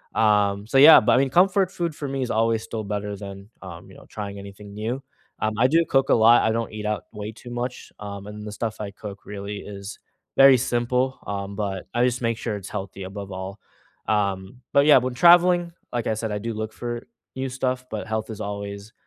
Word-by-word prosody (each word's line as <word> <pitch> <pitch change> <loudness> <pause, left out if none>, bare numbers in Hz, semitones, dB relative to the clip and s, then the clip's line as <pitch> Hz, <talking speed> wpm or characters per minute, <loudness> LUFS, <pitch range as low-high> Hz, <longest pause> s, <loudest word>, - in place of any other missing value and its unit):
Um, 105 -2 +2
so 135 - +1
yeah, 150 +4 +10
but 115 +2 +2
I - - +5
mean, 135 0 +2
comfort 185 +4 +3
food 170 -5 -3
for 145 - -5
me 135 0 -3
is 125 - -3
always 115 0 +1
still 110 -1 -5
better 105 0 -4
than, 100 0 -9
um, 85 -2 -10
you - - -15
know, - - -15
trying 100 -1 -6
anything 100 +1 -11
new. 115 +6 -4 0.4
Um, 110 0 0
I 125 +2 +5
do 165 +3 +3
cook 135 0 +2
a - - +6
lot. 115 +1 +6
I 110 - +2
don't 115 0 -2
eat 105 -1 -6
out 105 -4 -2
way 105 0 -6
too 115 +2 -12
much, 120 +1 -5
um, 100 -1 -7
and 105 0 -8
the 105 - -6
stuff 110 0 -4
I 105 - -4
cook 100 -1 -10
really 100 0 -6
is 100 0 -8 0.4
very 135 -1 +8
simple, 125 +1 0
um, 100 0 -4
but 100 -3 -3
I 120 +1 +2
just 125 0 +1
make 115 -1 0
sure 115 -2 -3
it's 95 - -9
healthy 95 0 -6
above 100 +1 -7
all. 95 +2 -6 0.5
Um, 100 +2 -1
but 140 +1 +5
yeah, 150 -3 +8
when 125 0 0
traveling, 175 +3 +5 0.2
like 120 -1 -1
I 110 - +1
said, 110 0 -3
I 105 - -2
do 115 +2 -4
look 110 0 -5
for 120 -1 -5 0.3
new 130 0 -2
stuff, 130 0 -2
but 110 0 -4
health 110 0 -3
is 110 0 -7
always 100 +1 -6
110 Hz, 225 wpm, -24 LUFS, 100-125 Hz, 0.5 s, yeah